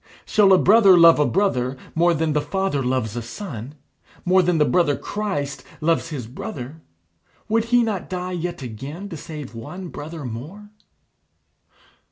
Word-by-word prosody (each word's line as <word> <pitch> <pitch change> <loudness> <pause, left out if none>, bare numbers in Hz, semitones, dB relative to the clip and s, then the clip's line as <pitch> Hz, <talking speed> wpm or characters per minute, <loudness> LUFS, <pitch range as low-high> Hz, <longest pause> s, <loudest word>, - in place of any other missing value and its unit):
Shall 205 -2 +4
a 190 - +8
brother 200 -1 +6
love 165 -2 +7
a 150 - +3
brother 135 -10 0 0.2
more 170 +1 +3
than 160 0 0
The 150 - +1
Father 190 -5 -1
loves 125 -4 -1
a 120 - -3
son? 130 - -7 0.5
more 185 +1 +5
than 175 -1 +1
The 150 - +4
Brother 155 -5 +2
Christ 190 -10 -4 0.2
loves 165 +1 +1
his 140 -7 -5
brother? 130 +5 -7 0.7
Would 225 +1 +1
he 245 0 +3
not 210 -5 -3
die 180 0 -4
yet 175 -4 -4
again 140 - -7
to 170 - -6
save 150 -4 -8
one 175 +11 -8
brother 155 -1 -7
more? 155 - -8
165 Hz, 160 wpm, -22 LUFS, 135-190 Hz, 0.7 s, a